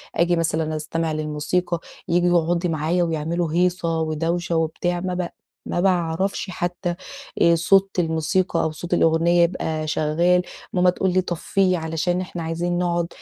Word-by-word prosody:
آجي 170 +1 +3
مثلًا 160 -1 0
أستمع 160 +1 -2
للموسيقى 155 +3 -1 0.3
ييجوا 175 -1 +3
يقعدوا 175 +1 0
معايا 165 +3 +1
ويعملوا 165 0 -1
هيصة 175 -2 +1
ودوشة 165 +2 -1
وبتاع 165 +2 0
ما 185 0 -3
بع 180 -1 -2 0.4
ما 175 - -1
باعرَفش 185 +1 0
حتى 175 0 -3 0.5
آآ 170 0 +6
صوت 195 +4 +4
الموسيقى 165 +3 +1
أو 160 - 0
صوت 170 +3 -5
الأغنية 170 +1 +4
يبقى 160 -3 -1
شغال 170 +4 +2 0.3
ماما 180 0 +4
تقول 180 +1 0
لي: 185 - +3
"طفيه 185 +1 0
علشان 165 +2 -1
إحنا 175 -2 -6
عايزين 170 +2 -1
نقعُد 175 -1 0
170 Hz, 145 wpm, -22 LUFS, 160-180 Hz, 0.5 s, آآ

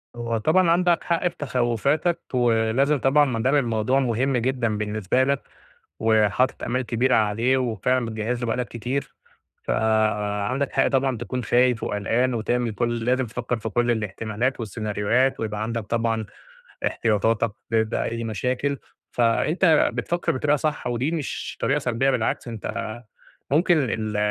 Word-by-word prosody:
هو 115 -1 -2
طبعًا 165 +9 +3
عندك 175 0 +2
حق 170 +1 +1
في - - -5
تخوفاتك، 140 +5 0
ولازم 120 +4 +2
طبعًا 145 +3 +4
ما 120 -5 -2
دام 135 +3 +3
الموضوع 120 0 +1
مهم 130 +1 +1
جدًا 120 -3 0
بالنسبة 105 +3 0
لك، 140 0 0 0.6
وحاطط 110 +3 +2
آمال 125 +2 0
كبيرة 120 +2 +1
عليه 115 +5 +2
وفعلًا 125 +1 0
بتجهز 115 +2 -3
له 120 - -2
بقى 115 - 0
لك 125 -3 -2
كتير، 125 +6 -4 0.5
فعندك 110 +3 0
حق - - +3
طبعًا 135 -2 +1
تكون 125 0 -4
خايف 125 0 +2
وقلقان 120 +5 0
وتعمل 120 +1 -1
كل 120 +1 0
ال 115 -1 -3
لازم 130 +1 +2
وتفكر 120 +1 -3
في 110 - -4
كل 120 +2 +1
الاحتمالات 110 +3 -2
والسيناريوهات 110 +4 0
ويبقى 105 -1 -3
عندك 115 0 -2
طبعًا 115 -1 -1 0.6
احتياطاتك 115 +1 +1 0.2
ب - - -4
بأي 115 +1 -1
مشاكل، 125 +6 -1 0.3
فأنت 155 +8 +3
بتفكر 175 0 -1
بطريقة 145 +3 +1
صح 155 +1 -2
ودي 125 +5 0
مش 160 -5 -4
طريقة - - +1
سلبية 125 +3 +1
بالعكس 120 0 -1
أنت 110 0 -5 0.5
ممكن 170 +4 +4
ال 110 -1 -2
120 Hz, 145 wpm, -24 LUFS, 110-130 Hz, 0.6 s, طبعًا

